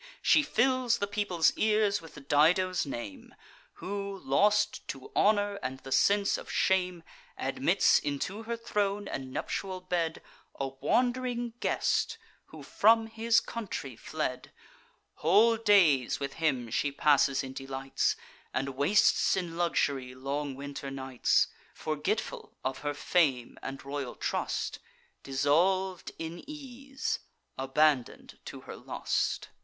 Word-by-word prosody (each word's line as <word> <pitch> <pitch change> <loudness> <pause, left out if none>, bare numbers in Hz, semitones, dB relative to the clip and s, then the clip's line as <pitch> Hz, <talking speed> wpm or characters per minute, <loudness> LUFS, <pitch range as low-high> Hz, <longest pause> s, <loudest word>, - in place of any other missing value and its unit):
She - - +6
fills 255 -3 +2
the 200 - -1
people's 200 -5 +1
ears 210 -1 +2
with 150 -4 -13
Dido's 180 +5 +3
name, 280 -4 -7 0.4
Who, 200 0 -5
lost 205 +10 +2
to 420 - -7
honour 205 -1 +2
and 130 +1 -4
the 135 - -10
sense 200 +7 +3
of - - -9
shame, 180 -2 +1 0.3
Admits - - +3
into 150 +9 -3
her 230 +1 -4
throne 205 -3 -1
and 130 -1 -5
nuptial 185 +6 -3
bed 175 -3 -2 0.4
A 135 -1 -1
wand'ring 245 - 0
guest, - - 0 0.3
who - - -12
from 225 +1 +4
his 225 +1 +2
country 185 - -6
fled: 130 -1 -4 0.7
Whole 210 +9 +5
days 190 - +4
with 140 -1 -4
him 130 -8 -1
she 145 +4 0
passes 140 -1 +3
in 130 0 -7
delights, 135 0 -1 0.4
And 135 +1 0
wastes 145 +10 +3
in 175 -3 -3
luxury 140 -7 0
long 140 +1 -3
winter 140 0 -6
nights, 130 -2 +1 0.3
Forgetful 155 +8 -3
of 130 0 -2
her 145 0 -3
fame 140 -7 +1
and 135 0 -7
royal 140 -2 -4
trust, - - -2 0.4
Dissolv'd 170 +7 +1
in 165 +1 -6
ease, 270 -2 -5 0.4
abandon'd 135 0 0
to - - -8
her - - -9
lust. - - -2
175 Hz, 125 wpm, -30 LUFS, 140-210 Hz, 0.7 s, She